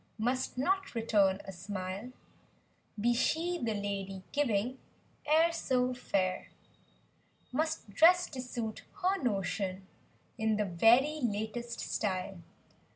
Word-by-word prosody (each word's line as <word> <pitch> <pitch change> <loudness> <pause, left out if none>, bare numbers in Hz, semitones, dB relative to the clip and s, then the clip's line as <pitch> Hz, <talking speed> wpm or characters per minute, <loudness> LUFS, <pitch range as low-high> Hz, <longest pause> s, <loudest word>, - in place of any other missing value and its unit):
Must 250 +3 -1
not 385 +5 0
return 205 -4 +2
a 195 - -6
smile. 190 +4 -5 0.9
Be 240 +3 +3
she, 335 +8 +1
the 225 -3 0
lady 195 -2 -4
giving, 255 -3 0 0.5
e'er 325 +2 +5
so 255 -6 0
fair; 190 -6 -1 1.0
Must 315 +2 -1
dress 355 - +6
to 260 -3 -4
suit 235 -3 -4 0.2
her 380 +2 +2
notion, 195 -4 -1 0.5
in 220 -1 +2
the 210 - +1
very 240 - +4
latest 235 +1 -2
style. 190 -2 -2
230 Hz, 110 wpm, -32 LUFS, 200-265 Hz, 1.0 s, dress